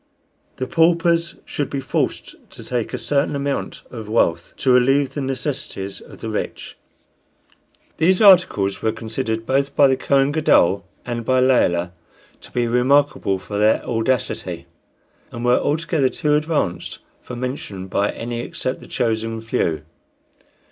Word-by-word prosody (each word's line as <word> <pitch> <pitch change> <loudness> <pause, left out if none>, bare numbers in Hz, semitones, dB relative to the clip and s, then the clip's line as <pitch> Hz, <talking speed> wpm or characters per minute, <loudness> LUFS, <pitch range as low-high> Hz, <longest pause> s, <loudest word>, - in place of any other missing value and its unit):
The 130 - -3
paupers 170 +2 +2
should 145 - -3
be 140 - -3
forced - - -2 0.2
to - - -11
take 120 -3 -3
a - - -3
certain 145 0 0
amount 140 0 -3
of 110 -4 -8
wealth, 85 -6 +1
to 130 - +2
relieve 135 +2 +3
the 145 - -3
necessities 130 -6 -4
of - - -14
the - - -4
rich. - - -4 1.2
These 180 +3 +3
articles 180 - +5
were 110 - +1
considered 115 0 -3
both 140 +2 0
by 145 - +6
the 135 - +3
Kohen 135 +1 +2
Gadol 100 - +3 0.2
and 120 -1 -3
by 130 +3 +2
Layelah 90 -9 +2 0.5
to - - -13
be 120 -1 0
remarkable 125 -3 +2
for 100 +2 -5
their 105 +1 +3
audacity, 120 +1 -2 0.7
and 120 +1 -5
were 125 0 +4
altogether 155 -2 +1
too 150 +2 0
advanced 150 - -1 0.2
for 125 - -8
mention 120 -7 -5
by 100 +2 0
any 120 0 -4
except 130 +2 -4
the - - -13
chosen 115 -2 -1
few. 100 -8 -1
125 Hz, 145 wpm, -21 LUFS, 110-145 Hz, 1.2 s, by